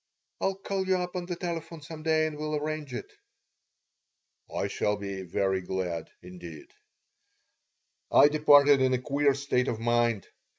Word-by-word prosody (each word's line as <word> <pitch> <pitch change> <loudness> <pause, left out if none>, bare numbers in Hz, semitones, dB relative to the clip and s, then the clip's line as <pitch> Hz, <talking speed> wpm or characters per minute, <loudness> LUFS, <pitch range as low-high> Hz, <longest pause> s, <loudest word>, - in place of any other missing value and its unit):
I'll 195 - 0
call 195 -1 -3
you 190 -1 +3
up 180 0 -4
on 175 -1 -3
the 175 - -3
telephone 165 -2 -5
some 155 +1 -9
day 155 0 +2
and 155 -1 -3
we'll 155 0 -3
arrange 150 -1 -3
it." 125 - -7 1.4
"I - - -2
shall 105 0 -1
be 100 -1 -5
very 95 +1 -1
glad, 90 -3 -3
indeed." 90 -4 -11 1.4
I - - +8
departed 145 -2 +6
in 130 -1 +3
a - - -2
queer 140 +1 +1
state 135 -2 0
of 110 - -2
mind. 120 -3 +1
140 Hz, 155 wpm, -28 LUFS, 105-155 Hz, 1.4 s, I